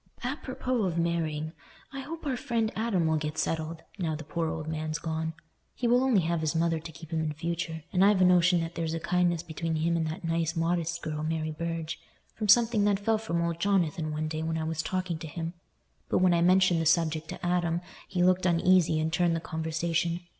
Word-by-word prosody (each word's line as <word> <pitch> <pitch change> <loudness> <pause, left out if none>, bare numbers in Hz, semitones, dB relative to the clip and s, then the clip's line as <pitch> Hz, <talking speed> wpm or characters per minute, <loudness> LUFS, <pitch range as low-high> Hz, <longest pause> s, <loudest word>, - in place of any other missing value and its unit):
Apropos 255 -3 -2
of 175 -2 -1
marrying, 160 -2 -1 0.4
I 275 - -5
hope 315 +4 -7
our 270 -3 0
friend 235 -4 -1
Adam 215 -7 +1
will 160 0 +2
get 150 0 -3
settled, 160 0 -2 0.2
now 160 -4 -1
the 160 - -7
poor 160 +2 -2
old 160 -1 -4
man's 155 -1 -2
gone. 160 0 -3 0.4
He 245 - -1
will 245 +2 +4
only 245 -8 +4
have 170 0 0
his 155 +1 -1
mother 165 0 +1
to 160 +1 -9
keep 160 0 -11
in 160 -1 0
future, 165 0 -3
and 185 0 +4
I've 200 -1 +5
a 185 - +6
notion 180 -1 +5
that 165 +1 -4
there's 165 -1 -2
a - - -2
kindness 175 -1 +1
between 165 0 -3
him 165 +2 +1
and 165 -1 0
that 155 +3 -5
nice 165 0 0
modest 170 0 -1
girl, 150 -1 -3
Mary 155 0 -1
Burge, 165 0 -4 0.3
from 215 - -3
something 225 0 +5
that 205 -1 +3
fell 220 +1 +1
from 170 -6 -1
old 170 -1 -2
Jonathan 170 -4 +1
one 155 +1 -2
day 155 0 -3
when 160 0 -1
I 160 - -2
was 160 0 -1
talking 185 -2 -2
to 160 - -6
him. 165 +2 -5 0.6
But - - +2
when 185 -1 +4
I 170 - +3
mentioned 180 -1 +4
the 160 - +1
subject 160 -1 +2
to 180 - -6
Adam 175 -1 +1 0.3
he 180 -1 0
looked 185 0 +3
uneasy 170 -1 +4
and 160 +1 -1
turned 175 0 +2
the - - -1
conversation. 165 +2 -1
170 Hz, 220 wpm, -29 LUFS, 160-180 Hz, 0.6 s, a